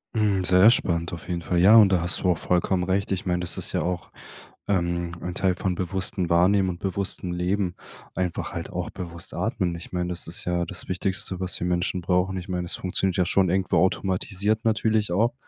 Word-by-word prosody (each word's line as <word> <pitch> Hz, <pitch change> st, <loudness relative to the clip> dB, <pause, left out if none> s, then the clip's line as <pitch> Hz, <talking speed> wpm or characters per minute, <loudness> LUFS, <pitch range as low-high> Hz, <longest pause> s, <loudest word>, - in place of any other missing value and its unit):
Hm, 105 Hz, -4 st, +1 dB
sehr 90 Hz, +4 st, +6 dB
spannend 85 Hz, -7 st, 0 dB
auf 85 Hz, -, -8 dB
jeden 85 Hz, -1 st, -3 dB
Fall, 85 Hz, +1 st, -1 dB
ja. 100 Hz, +5 st, +7 dB
Und 110 Hz, -3 st, +8 dB
da 90 Hz, -3 st, +2 dB
hast 85 Hz, +2 st, +5 dB
du 90 Hz, -, +1 dB
auch 85 Hz, -, 0 dB
vollkommen 90 Hz, +1 st, 0 dB
recht. 95 Hz, +2 st, -1 dB
Ich 95 Hz, -1 st, -2 dB
meine, 90 Hz, -1 st, 0 dB
das 90 Hz, -, 0 dB
ist -, -, -2 dB
ja -, -, 0 dB
auch, 90 Hz, -1 st, -3 dB, 0.6 s
ähm, 85 Hz, -3 st, -1 dB
ein 90 Hz, -, -4 dB
Teil 95 Hz, 0 st, 0 dB
von 90 Hz, -1 st, -2 dB
bewusstem 95 Hz, 0 st, -2 dB
Wahrnehmen 95 Hz, +3 st, +3 dB
und 85 Hz, -1 st, -5 dB
bewusstem 95 Hz, -1 st, -1 dB
Leben, 90 Hz, +1 st, -1 dB, 0.4 s
einfach 90 Hz, -2 st, -3 dB
halt -, -, -5 dB
auch -, -, -4 dB
bewusst 85 Hz, -1 st, -7 dB
atmen. 100 Hz, -7 st, -1 dB
Ich 85 Hz, -, -10 dB
meine, 90 Hz, -1 st, -2 dB
das 90 Hz, -1 st, -4 dB
ist 85 Hz, -, -3 dB
ja 90 Hz, 0 st, 0 dB
das -, -, -4 dB
Wichtigste, 95 Hz, 0 st, -2 dB
was 95 Hz, 0 st, -2 dB
wir -, -, -2 dB
Menschen 90 Hz, +1 st, -1 dB
brauchen. 90 Hz, +2 st, 0 dB
Ich 90 Hz, +1 st, -7 dB
meine, 90 Hz, -1 st, -2 dB
es 85 Hz, -, -1 dB
funktioniert 95 Hz, 0 st, -1 dB
ja 90 Hz, -, +2 dB
schon 95 Hz, +1 st, +2 dB
irgendwo 95 Hz, +1 st, +1 dB
automatisiert 95 Hz, +3 st, 0 dB
natürlich 110 Hz, -2 st, +1 dB
auch, 110 Hz, +7 st, +2 dB
90 Hz, 215 wpm, -25 LUFS, 90-95 Hz, 0.6 s, Und